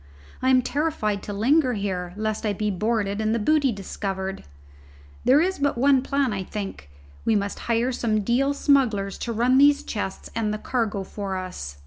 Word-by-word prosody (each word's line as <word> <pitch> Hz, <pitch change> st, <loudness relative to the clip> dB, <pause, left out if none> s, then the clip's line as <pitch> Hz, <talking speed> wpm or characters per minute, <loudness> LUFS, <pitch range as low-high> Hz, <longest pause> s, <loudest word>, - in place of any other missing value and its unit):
I 260 Hz, -, +2 dB
am 255 Hz, -1 st, +5 dB
terrified 255 Hz, -8 st, -1 dB
to 205 Hz, -, -6 dB
linger 255 Hz, +6 st, +2 dB
here, 185 Hz, -4 st, -3 dB
lest 215 Hz, 0 st, -2 dB
I 210 Hz, -2 st, 0 dB
be 210 Hz, +1 st, -1 dB
boarded 210 Hz, +1 st, -1 dB
and 220 Hz, +1 st, +1 dB
the -, -, +2 dB
booty 280 Hz, +4 st, +2 dB
discovered. 195 Hz, -1 st, -4 dB, 0.8 s
There 275 Hz, +4 st, +6 dB
is 375 Hz, 0 st, 0 dB
but 285 Hz, -3 st, +1 dB
one 270 Hz, +1 st, +4 dB
plan, 275 Hz, -3 st, 0 dB
I 190 Hz, -1 st, -3 dB
think: 195 Hz, -, -6 dB, 0.3 s
we 225 Hz, -, +2 dB
must 200 Hz, -1 st, -1 dB
hire 235 Hz, +2 st, +2 dB
some 220 Hz, -3 st, 0 dB
Deal 265 Hz, +7 st, +1 dB
smugglers 225 Hz, -10 st, +2 dB
to 235 Hz, -, -3 dB
run 245 Hz, +4 st, +3 dB
these 285 Hz, 0 st, +5 dB
chests 205 Hz, -3 st, -5 dB
and 220 Hz, -2 st, 0 dB
the 215 Hz, -, -2 dB
cargo 215 Hz, -4 st, -2 dB
for 195 Hz, 0 st, -5 dB
us. 75 Hz, -, -6 dB
220 Hz, 180 wpm, -24 LUFS, 200-260 Hz, 0.8 s, There